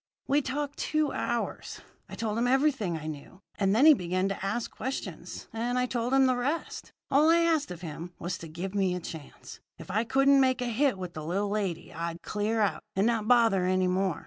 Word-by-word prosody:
"We 285 +2 +2
talked 290 +2 -4
two 310 -2 0
hours. 235 -1 -3 0.3
I - - -7
told 220 -2 -2
him 245 - +2
everything 260 - +2
I 155 - -8
knew; 155 +4 -8 0.2
and 195 0 +2
then 260 +6 +5
he 315 - +10
began 185 -4 -1
to 195 - -4
ask 210 +4 -2
questions, 265 +1 -6
and 240 +2 -1
I 250 - +2
told 245 -1 -2
him 270 0 +5
the 255 -1 +3
rest. 280 +7 -3 0.2
All 295 +4 +5
I 335 +1 +5
asked 325 -3 +2
of 175 -2 -8
him 170 +1 -7
was 175 0 -4
to 165 - -8
give 175 +5 -6
me 190 -3 +1
a - - -3
chance. 160 -4 -10 0.2
If - - -9
I 215 +4 +1
couldn't 270 +3 +4
make 260 -1 +2
a 250 - -1
hit 245 0 +1
with 180 -2 -6
the 155 - -6
little 195 +6 -1
lady, 200 -5 -3
I'd 170 0 -5
clear 215 +2 -1
out, 205 - +1
and 195 +2 +2
not 225 -2 +1
bother 225 -6 +4
any 185 0 +2
more. 185 0 0
215 Hz, 220 wpm, -28 LUFS, 185-260 Hz, 0.3 s, he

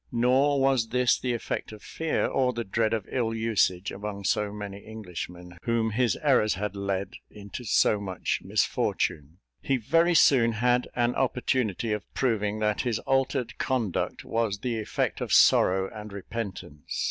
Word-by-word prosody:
Nor 130 +4 +3
was 135 -4 +2
this 125 +1 +2
the 125 -1 -1
effect 115 - -4
of 105 -2 -12
fear, 160 -1 -1
or 130 -2 +1
the 120 0 -3
dread 110 +2 0
of 110 -3 -1
ill 115 -3 -1
usage 100 -4 +1
among 100 0 -6
so 105 +1 0
many 100 -1 -7
Englishmen, 90 -4 -8
whom 115 -1 0
his 120 +2 +1
errors 125 -8 +3
had 105 +1 -4
led 100 0 -2 0.2
into 105 +4 -9
so 105 -1 +3
much 95 -3 -2
misfortune. 80 0 -1 0.2
He 135 - +1
very 165 +9 +2
soon 120 -7 +5
had 125 +2 +1
an 120 0 +1
opportunity 125 -4 0
of 105 - -6
proving 110 -5 0
that 105 -1 0
his 120 -4 -1
altered 135 -3 0
conduct 120 -8 -1
was 115 -3 -1
the 120 -3 -2
effect 110 - -2
of - - -3
sorrow 95 +1 +5
and 105 -1 -8
repentance. 100 -7 -6
110 Hz, 160 wpm, -27 LUFS, 100-125 Hz, 0.2 s, soon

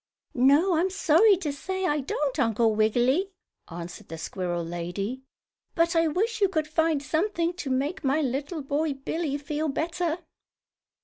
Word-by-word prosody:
"No, 290 +8 +4
I'm 360 +4 +2
sorry 380 +2 +4
to 310 -6 -3
say 375 +6 -3
I 295 -4 +1
don't, 280 +1 -2
Uncle 225 -2 +2
Wiggily," 245 - +2 0.4
answered 170 0 -8
the 165 - -7
squirrel 175 +1 -3
lady. 175 +9 -4 0.5
"But 335 +1 +2
I 330 0 +4
wish 425 +8 -1
you 395 - +4
could 315 -4 -1
find 315 -2 +1
something 335 +4 0
to 280 - -4
make 275 +7 -1
my 275 +3 +2
little 285 +3 -2
boy 290 +2 0
Billie 285 +2 -3
feel 300 +2 -3
better." 330 +3 -1
295 Hz, 150 wpm, -26 LUFS, 255-335 Hz, 0.5 s, No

